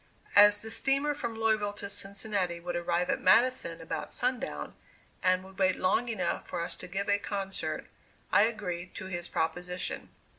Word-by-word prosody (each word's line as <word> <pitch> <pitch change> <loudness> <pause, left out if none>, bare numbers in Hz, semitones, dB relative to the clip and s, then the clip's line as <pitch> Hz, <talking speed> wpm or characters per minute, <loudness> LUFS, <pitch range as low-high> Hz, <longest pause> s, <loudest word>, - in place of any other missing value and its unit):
As 205 +1 +8
the 220 - -4
steamer 275 +6 +3
from 235 -5 -4
Louisville 215 -2 +2
to 205 0 -5
Cincinnati 200 -3 -3
would 175 0 -4
arrive 175 +1 0
at - - -1
Madison 225 -4 +3
about 165 - -4
sundown, 250 0 -2 0.5
and 185 0 +3
would 190 0 -14
wait 185 -1 +4
long 225 +6 +1
enough 185 -7 -2
for 175 - -3
us 170 0 -4
to 180 - -8
give 195 +2 -3
a 205 0 +3
concert, 195 -1 -3 0.5
I 205 - +6
agreed 185 -6 -4
to - - -6
his 175 -2 -3
proposition. 180 +2 -3
195 Hz, 170 wpm, -30 LUFS, 180-220 Hz, 0.5 s, As